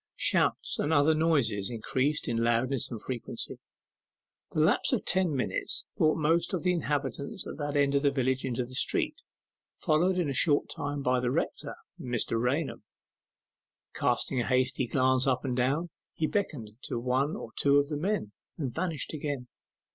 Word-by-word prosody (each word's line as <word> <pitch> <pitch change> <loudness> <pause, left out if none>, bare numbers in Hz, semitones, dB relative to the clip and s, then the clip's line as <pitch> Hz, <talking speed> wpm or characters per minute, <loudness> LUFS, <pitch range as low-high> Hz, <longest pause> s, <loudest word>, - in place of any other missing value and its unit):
Shouts - - +2
and 145 - 0
other 155 0 +4
noises 140 -11 +1
increased 130 +5 -1
in 115 - 0
loudness 120 +3 +1
and 115 - -5
frequency. 125 +1 -4 0.9
The 155 - +1
lapse 160 +6 +3
of 250 - 0
ten 185 -5 +2
minutes 130 - -1
brought 155 0 +3
most 165 +4 +2
of 175 - -4
the 180 -1 +3
inhabitants 145 - -3
of - - -7
that 145 -1 -2
end 140 -1 +3
of 140 - +3
the 140 - +4
village 130 -1 0
into 125 -1 -2
the 130 - -11
street, - - +1 0.6
followed 180 +4 +2
in 175 -4 +1
a 140 - -1
short 145 +3 +2
time 145 0 -3
by 125 0 +2
the 125 0 0
rector, - - -2 0.2
Mr. 120 -2 -1
Raunham. 125 0 -1 1.1
Casting 130 - 0
a - - -3
hasty 130 0 +1
glance 130 +1 +2
up 130 0 +1
and 125 -2 -1
down, 140 +7 0 0.2
he 160 - 0
beckoned 150 - -2
to - - -2
one 130 +5 0
or 115 - -7
two 140 0 +4
of 145 0 +2
the 150 - -2
men, 185 - -1 0.3
and 135 -6 -3
vanished 165 -5 -3
again. 140 -5 -4
140 Hz, 170 wpm, -29 LUFS, 125-155 Hz, 1.1 s, other